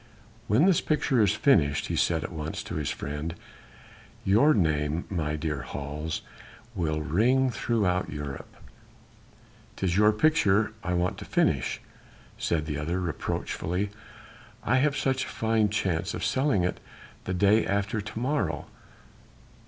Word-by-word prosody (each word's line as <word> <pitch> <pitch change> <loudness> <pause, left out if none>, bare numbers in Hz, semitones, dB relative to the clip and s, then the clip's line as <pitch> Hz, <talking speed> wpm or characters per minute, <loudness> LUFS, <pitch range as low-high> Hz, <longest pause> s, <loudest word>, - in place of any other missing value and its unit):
"When 120 +11 +4
this 190 -4 +4
picture 140 -5 +1
is 105 -1 +4
finished," 75 - +3
he - - -2
said - - +1
at - - -5
once 80 0 -5
to - - -7
his 75 -3 -2
friend, 75 +4 -4 0.9
"your 110 +11 +5
name, 80 -3 +1
my 75 -5 -1
dear 75 -2 -3
Hals, 75 +3 -5 0.5
will 80 -6 -1
ring 125 - +2
throughout 100 -4 0
Europe." 75 -2 -6 1.3
"'Tis 90 -3 -1
your 105 +1 +6
picture 110 -5 +3
I 90 0 -1
want 90 +1 0
to - - -8
finish," - - +1 0.6
said 80 -2 0
the 75 -2 -3
other 85 +5 -1
reproachfully, 90 +2 -2 0.7
"I 125 +4 +2
have 140 +1 +2
such 130 -1 0
a - - -8
fine 110 -2 +1
chance 95 -3 -1
of - - -3
selling 120 -5 +2
it 90 - -1 0.5
the 95 - -2
day 105 +4 +4
after 100 +2 -1
to 105 +2 -6
morrow." 105 - -1
95 Hz, 140 wpm, -27 LUFS, 80-110 Hz, 1.3 s, your